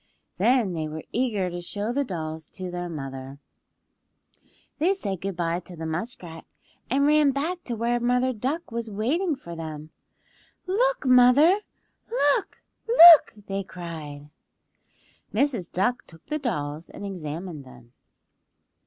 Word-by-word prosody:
Then 225 Hz, -2 st, +3 dB
they 160 Hz, -2 st, -3 dB
were 155 Hz, +1 st, -7 dB
eager 215 Hz, -7 st, 0 dB
to 175 Hz, 0 st, -5 dB
show 205 Hz, +6 st, -4 dB
the 285 Hz, +2 st, +1 dB
dolls 160 Hz, -, -5 dB
to 185 Hz, -2 st, -6 dB
their 175 Hz, 0 st, -4 dB
mother. 135 Hz, -3 st, -7 dB, 1.4 s
They 360 Hz, +6 st, +3 dB
said 195 Hz, -, -4 dB
good 195 Hz, -1 st, -3 dB
bye 170 Hz, 0 st, -1 dB
to 180 Hz, 0 st, -11 dB
the 165 Hz, 0 st, -6 dB
muskrat, 165 Hz, -1 st, -5 dB, 0.4 s
and 275 Hz, +3 st, +2 dB
ran 300 Hz, -1 st, +5 dB
back 325 Hz, +6 st, -2 dB
to 240 Hz, -, -3 dB
where 235 Hz, +2 st, 0 dB
Mother 250 Hz, +2 st, +1 dB
Duck 265 Hz, +9 st, -3 dB
was 230 Hz, -1 st, -4 dB
waiting 290 Hz, -, 0 dB
for 170 Hz, -10 st, -10 dB
them, 155 Hz, -1 st, -7 dB, 0.7 s
"Look, 480 Hz, -, +1 dB
mother! 255 Hz, +9 st, +6 dB, 0.5 s
Look! 290 Hz, -, 0 dB, 0.2 s
Look!" 345 Hz, -, +9 dB
they 195 Hz, 0 st, -3 dB
cried. 155 Hz, -5 st, -9 dB, 1.0 s
Mrs. 230 Hz, -, 0 dB
Duck 220 Hz, +7 st, -1 dB
took 165 Hz, -2 st, -16 dB
the 305 Hz, -, -3 dB
dolls 155 Hz, -, -4 dB
and -, -, -9 dB
examined 165 Hz, -3 st, -6 dB
them. 125 Hz, -2 st, -16 dB
195 Hz, 135 wpm, -25 LUFS, 165-265 Hz, 1.4 s, Look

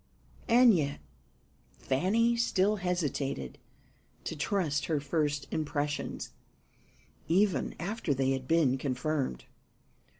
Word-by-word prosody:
And 240 Hz, 0 st, +7 dB
yet 145 Hz, -5 st, 0 dB, 0.8 s
Fanny 210 Hz, -, +2 dB
still 210 Hz, -3 st, +2 dB
hesitated 150 Hz, -, -2 dB, 0.6 s
to -, -, -4 dB
trust 150 Hz, -2 st, 0 dB
her 155 Hz, -3 st, +1 dB
first 145 Hz, 0 st, -1 dB
impressions, 145 Hz, -1 st, -2 dB, 1.0 s
even 190 Hz, +3 st, +2 dB
after 200 Hz, -2 st, -2 dB
they 135 Hz, -1 st, +1 dB
had 130 Hz, -1 st, -2 dB
been 140 Hz, -5 st, +3 dB
confirmed. 130 Hz, -, -2 dB
155 Hz, 95 wpm, -30 LUFS, 140-190 Hz, 1.0 s, And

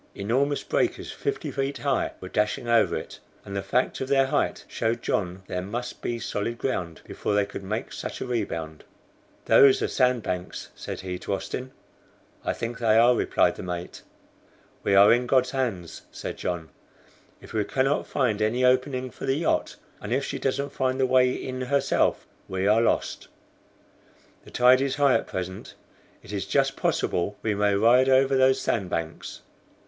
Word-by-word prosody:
Enormous 130 Hz, +8 st, 0 dB
breakers -, -, -1 dB
fifty 420 Hz, 0 st, -3 dB
feet 135 Hz, 0 st, -2 dB
high 140 Hz, -1 st, 0 dB
were 95 Hz, -, -8 dB
dashing 105 Hz, +5 st, -1 dB
over 115 Hz, -1 st, +3 dB
it, -, -, -7 dB, 0.3 s
and 100 Hz, -, -7 dB
the 100 Hz, -, -1 dB
fact 125 Hz, +8 st, 0 dB
of 130 Hz, -, -2 dB
their 135 Hz, 0 st, +3 dB
height 135 Hz, -, -1 dB
showed 115 Hz, +1 st, -2 dB
John 95 Hz, -1 st, -2 dB
there 90 Hz, -1 st, -3 dB
must 120 Hz, +6 st, -5 dB
be 120 Hz, -, -2 dB
solid 115 Hz, +1 st, -3 dB
ground 90 Hz, -11 st, -3 dB
before 105 Hz, -, -2 dB
they 105 Hz, -1 st, +3 dB
could 100 Hz, -, -8 dB
make 105 Hz, +4 st, -4 dB
such -, -, -6 dB
a -, -, -3 dB
rebound. 85 Hz, -10 st, -3 dB, 0.6 s
"Those 135 Hz, -1 st, +6 dB
are -, -, +1 dB
sand 125 Hz, -3 st, +1 dB
banks," 90 Hz, 0 st, -5 dB
he -, -, -6 dB
said 90 Hz, -1 st, -6 dB
to -, -, -3 dB
Austin. 130 Hz, +6 st, -5 dB, 0.7 s
"I -, -, 0 dB
think 115 Hz, 0 st, -5 dB
they 110 Hz, -2 st, +3 dB
are," 120 Hz, +2 st, +6 dB
replied -, -, +1 dB
the -, -, -6 dB
mate. 90 Hz, -1 st, -6 dB, 0.8 s
"We 100 Hz, -, +2 dB
are 100 Hz, +3 st, +8 dB
in 120 Hz, +1 st, +1 dB
God's 130 Hz, 0 st, +3 dB
hands," 115 Hz, -11 st, -3 dB
said -, -, -6 dB
John. 85 Hz, -3 st, -4 dB, 0.7 s
"If -, -, -13 dB
we 110 Hz, -1 st, +1 dB
cannot 135 Hz, +6 st, 0 dB
find 115 Hz, -6 st, 0 dB
any 120 Hz, +4 st, +2 dB
opening 130 Hz, 0 st, +1 dB
for -, -, -7 dB
the 135 Hz, +1 st, +2 dB
yacht, 160 Hz, -, 0 dB, 0.3 s
and 100 Hz, -, -6 dB
if 135 Hz, +3 st, +1 dB
she -, -, -4 dB
doesn't 140 Hz, +1 st, -1 dB
find 130 Hz, 0 st, -1 dB
the 130 Hz, -, +4 dB
way 125 Hz, 0 st, +4 dB
in 130 Hz, 0 st, -5 dB
herself, 140 Hz, +2 st, +1 dB, 0.2 s
we 95 Hz, 0 st, -2 dB
are 105 Hz, +3 st, +4 dB
lost." 115 Hz, -, 0 dB, 1.2 s
"The -, -, -12 dB
tide 125 Hz, +1 st, +5 dB
is 135 Hz, -1 st, 0 dB
high 140 Hz, -2 st, +4 dB
at -, -, +1 dB
present, 95 Hz, 0 st, -6 dB, 0.5 s
it -, -, -10 dB
is -, -, -3 dB
just -, -, +1 dB
possible 90 Hz, +4 st, -1 dB
we 110 Hz, -, +1 dB
may 100 Hz, 0 st, +2 dB
ride 120 Hz, +5 st, +5 dB
over 135 Hz, +1 st, +4 dB
those 130 Hz, 0 st, +4 dB
sand 95 Hz, -6 st, -1 dB
banks." 80 Hz, -2 st, -5 dB
120 Hz, 180 wpm, -26 LUFS, 100-130 Hz, 1.2 s, are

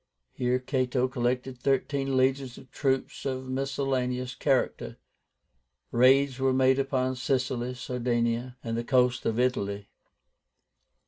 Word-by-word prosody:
Here 125 Hz, 0 st, +1 dB
Cato 130 Hz, -1 st, 0 dB
collected 125 Hz, 0 st, -2 dB
thirteen 135 Hz, 0 st, 0 dB
legions 130 Hz, -1 st, +1 dB
of 130 Hz, -, -14 dB
troops 135 Hz, -2 st, -1 dB
of 130 Hz, -1 st, -3 dB
miscellaneous 130 Hz, -2 st, -1 dB
character. 135 Hz, 0 st, 0 dB, 0.9 s
Raids 130 Hz, +2 st, +4 dB
were 135 Hz, 0 st, +2 dB
made 130 Hz, +1 st, +3 dB
upon 130 Hz, -1 st, 0 dB
Sicily, 125 Hz, -1 st, -1 dB
Sardinia, 120 Hz, 0 st, -1 dB
and 115 Hz, -1 st, -3 dB
the 115 Hz, -, -2 dB
coasts 125 Hz, -1 st, +2 dB
of 115 Hz, +1 st, 0 dB
Italy. 100 Hz, -5 st, -1 dB
130 Hz, 115 wpm, -28 LUFS, 125-135 Hz, 0.9 s, Raids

